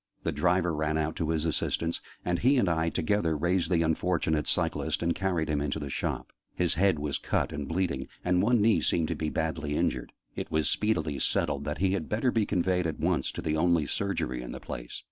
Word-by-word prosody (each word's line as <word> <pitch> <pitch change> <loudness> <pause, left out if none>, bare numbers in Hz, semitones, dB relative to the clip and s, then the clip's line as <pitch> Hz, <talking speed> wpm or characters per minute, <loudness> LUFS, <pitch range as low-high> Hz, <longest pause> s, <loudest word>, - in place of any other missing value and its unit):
The - - 0
driver 85 +3 +2
ran 75 0 0
out 80 0 -1
to 80 - -1
his 80 -1 0
assistance, 85 +1 -1 0.2
and 90 -1 +1
he 135 +4 +4
and 120 - +3
I 85 -1 +1
together 80 -1 +1
raised 85 +2 +1
the 85 -2 +3
unfortunate 80 -2 +1
cyclist - - 0
and 85 0 +2
carried 90 -4 0
him 75 -2 0
into 75 0 -1
the 70 -3 -5
shop. - - -3 0.2
His 90 -1 +1
head 95 0 +3
was 75 -2 -2
cut - - -1
and 70 -1 -4
bleeding; 85 -6 -1 0.2
and 90 0 +3
one 115 +2 +3
knee 110 +1 +4
seemed 80 -2 +1
to - - -1
be 80 - -2
badly 80 -2 -2
injured; - - -1 0.2
and - - -2
it - - -22
was 80 -3 +2
speedily 80 -10 0
settled - - 0
that - - -2
he 95 0 +2
had 100 - -2
better 115 +4 +1
be 110 -3 +1
conveyed 90 -2 +1
at 80 - -4
once 80 -3 +1
to - - -5
the 75 -1 0
only 85 -1 +3
Surgery 65 -8 -2
in - - -6
the - - -6
place. - - -6
80 Hz, 220 wpm, -29 LUFS, 75-90 Hz, 0.2 s, he